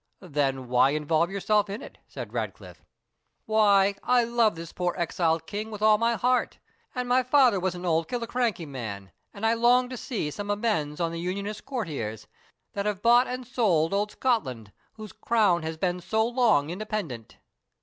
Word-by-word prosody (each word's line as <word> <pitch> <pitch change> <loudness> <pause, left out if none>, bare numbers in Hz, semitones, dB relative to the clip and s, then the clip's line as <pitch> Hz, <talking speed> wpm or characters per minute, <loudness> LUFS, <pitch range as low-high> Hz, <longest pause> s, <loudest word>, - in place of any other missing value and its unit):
"Then 135 -6 -1
why 125 +2 +4
involve 155 +3 +1
yourself 205 +1 +1
in 200 +3 -5
it?" - - -12
said - - -8
Ratcliffe. - - -6 0.6
"Why, 205 -2 +4
I 250 -1 +3
love 230 -4 +2
this 165 0 -9
poor 180 -1 -1
exiled 165 -1 0
king 215 +1 -5
with 210 -1 -6
all 215 -1 +5
my 230 0 +2
heart; 250 +4 0 0.4
and 250 -1 -2
my 250 +1 +4
father 255 -5 +4
was 185 0 -1
an 175 +1 -7
old 165 -1 +1
Killiecrankie 235 -7 -2
man, 105 -8 -7 0.2
and 205 +2 -5
I 225 - +4
long 245 +2 +3
to 255 - -6
see 215 - -3
some 205 +5 -6
amends 205 -9 -1
on 165 -1 0
the 165 - -5
Unionist 200 +4 -4
courtiers, 150 - -4 0.5
that 200 +1 -2
have 205 -2 -3
bought 240 +2 +5
and 250 0 -5
sold 195 -10 +1
old 205 +1 0
Scotland, 130 - -1 0.2
whose 215 -2 -10
crown 210 -7 +2
has 160 0 -5
been 180 +1 -1
so 220 +5 +1
long 230 - +2
independent." 180 - -5
200 Hz, 175 wpm, -26 LUFS, 165-230 Hz, 0.6 s, all